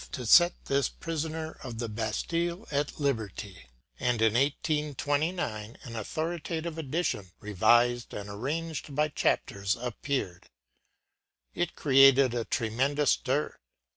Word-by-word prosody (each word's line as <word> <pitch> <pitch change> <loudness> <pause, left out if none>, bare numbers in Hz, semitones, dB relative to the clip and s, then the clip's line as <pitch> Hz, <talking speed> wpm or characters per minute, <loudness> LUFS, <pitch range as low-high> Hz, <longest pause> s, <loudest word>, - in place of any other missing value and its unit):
to 125 - -5
set 175 +9 +5
this 140 0 +1
“prisoner 160 0 -4
of 120 -4 -6
the 115 0 -3
Bastille” 170 - -2
at 145 +1 -1
liberty; 105 - -3 0.3
and 125 -2 +1
in 110 -1 +3
1829 145 - -1
an 115 -2 -8
authoritative 160 +6 -3
edition, 140 - -2
revised 120 +4 +3
and 100 0 -6
arranged 145 +8 -4
by 150 +1 +2
chapters, 100 -7 0
appeared. 120 -6 -4 1.0
It 175 -1 -2
created 135 -2 +6
a 120 -2 -2
tremendous 130 +5 +1
stir. 140 +4 -1
135 Hz, 110 wpm, -29 LUFS, 115-155 Hz, 1.0 s, created